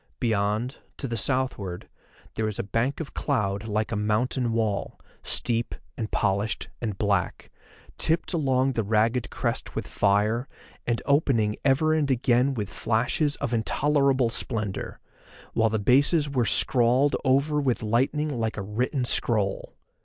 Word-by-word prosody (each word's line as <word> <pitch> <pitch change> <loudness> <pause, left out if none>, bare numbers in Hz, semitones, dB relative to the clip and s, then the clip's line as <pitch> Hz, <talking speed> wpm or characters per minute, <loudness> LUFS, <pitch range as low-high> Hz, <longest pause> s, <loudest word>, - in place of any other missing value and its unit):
Beyond, 110 +2 0 0.2
to 135 - -4
the 115 - -3
southward, 115 -7 -1 0.5
there 110 - -2
was 110 -2 -2
a - - -2
bank 115 +7 -1
of 160 - -6
cloud 105 -6 -1
like 110 +1 -1
a - - -1
mountain 115 +4 0
wall, 110 -3 -1 0.2
steep, 115 -1 0 0.2
and 110 -2 -4
polished, 100 +3 -1
and 105 -5 -3
black, 100 -3 -1 0.5
tipped 165 +4 +1
along 135 -4 +2
the 115 - -1
ragged 115 +3 +1
crest - - -3
with - - -3
fire, 105 +5 +1 0.4
and 120 -1 -1
opening 135 -7 +2
ever 145 +3 +3
and 155 -3 +1
again 125 +1 +2
with 105 -4 -3
flashes 125 - 0
of 120 - -3
intolerable 135 +1 +2
splendour, 110 -5 -2 0.5
while 115 0 +3
the 110 - 0
bases 140 - +3
were 130 -4 0
scrawled 125 +5 +3
over 140 +3 +2
with 130 -5 0
lightning 130 +5 0
like 110 -1 -2
a 100 - -3
written 125 +6 -1
scroll. 105 -5 0
120 Hz, 145 wpm, -26 LUFS, 110-135 Hz, 0.5 s, ever